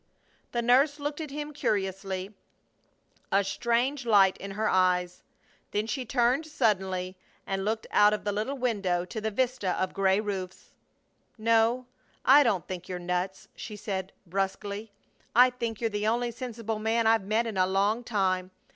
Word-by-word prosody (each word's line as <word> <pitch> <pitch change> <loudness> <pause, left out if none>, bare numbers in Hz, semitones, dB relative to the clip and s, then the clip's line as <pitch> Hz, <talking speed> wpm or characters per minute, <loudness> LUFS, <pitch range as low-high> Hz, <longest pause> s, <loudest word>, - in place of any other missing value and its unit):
The 240 -1 -1
nurse 270 +5 +4
looked 290 +2 -3
at 305 - -5
him 295 +1 -5
curiously, 195 -4 -2 1.0
a 200 +1 +4
strange 240 +7 0
light 200 -5 +5
in 195 - -7
her 215 +3 -1
eyes. 180 -1 +2 0.5
Then 210 +1 -1
she 240 +4 -3
turned 250 +5 +1
suddenly 190 -9 0 0.3
and 195 0 -2
looked 220 +2 -1
out 205 0 +6
of 210 - -2
the 205 - 0
little 220 +7 -2
window 195 -8 0
to 220 +4 -6
the 220 - -1
vista 235 -4 0
of 185 - -1
gray 195 0 +2
roofs. 190 -3 -5 0.7
"No! 230 +3 +2 0.4
I 280 +3 +8
don't 205 - +1
think 180 -1 -6
you're 180 - -3
nuts!" 180 +2 -3
she 215 - -7
said, 190 -2 -4
brusquely. 200 +3 -3 0.4
"I 250 +1 +7
think 235 -3 -4
you're 230 - +1
the 210 +1 -1
only 240 +2 +1
sensible 230 -3 -5
man 225 +1 +1
I've 225 -3 +3
met 220 +3 +2
in 225 -3 -4
a 185 -1 +3
long 200 +5 +1
time. 190 -5 0
210 Hz, 165 wpm, -28 LUFS, 190-235 Hz, 1.0 s, I